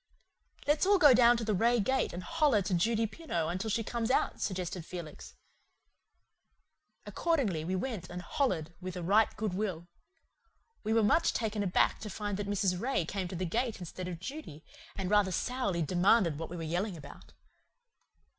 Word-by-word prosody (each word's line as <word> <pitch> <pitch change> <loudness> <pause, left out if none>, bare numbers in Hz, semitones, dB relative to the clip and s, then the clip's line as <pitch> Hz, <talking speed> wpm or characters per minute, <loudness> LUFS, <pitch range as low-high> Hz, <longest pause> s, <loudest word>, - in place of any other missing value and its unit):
"Let's 295 +5 +2
all 405 0 +6
go 295 -7 +7
down 240 0 +6
to 230 - -3
the 215 -1 0
Ray 235 +5 +3
gate 260 +5 +1
and 175 +1 -6
holler 295 - +2
to 185 +1 -2
Judy 225 +6 +2
Pineau 175 - -3
till 195 +4 -3
she 225 +2 0
comes 230 +1 -2
out," 260 - +1
suggested 180 -2 -3
Felix. 170 -3 -9 1.7
Accordingly, 255 - 0
we 185 +4 -2
went 185 -3 -4
and 180 0 -6
"hollered," 170 - -1
with 185 0 -5
a 180 - -4
right 205 +5 +4
good 215 -4 -2
will. 185 -4 -3 1.0
We 220 - -2
were 225 0 +4
much 320 +11 +3
taken 220 -2 -1
aback 190 -3 +2
to 215 - -6
find 205 -1 -3
that 205 -1 -4
Mrs. 195 -3 0
Ray 255 -9 0
came 190 +1 -3
to 180 - -7
the 185 +2 -2
gate 230 +6 -1
instead 180 +1 -6
of 175 -2 -5
Judy, 185 - -8 0.3
and 190 -2 -3
rather 205 -1 +3
sourly 200 -4 -1
demanded 175 -1 +3
what 165 - -5
we 175 - -6
were 165 - -5
yelling 175 +4 -2
about. 140 -2 -13
200 Hz, 180 wpm, -31 LUFS, 175-235 Hz, 1.7 s, go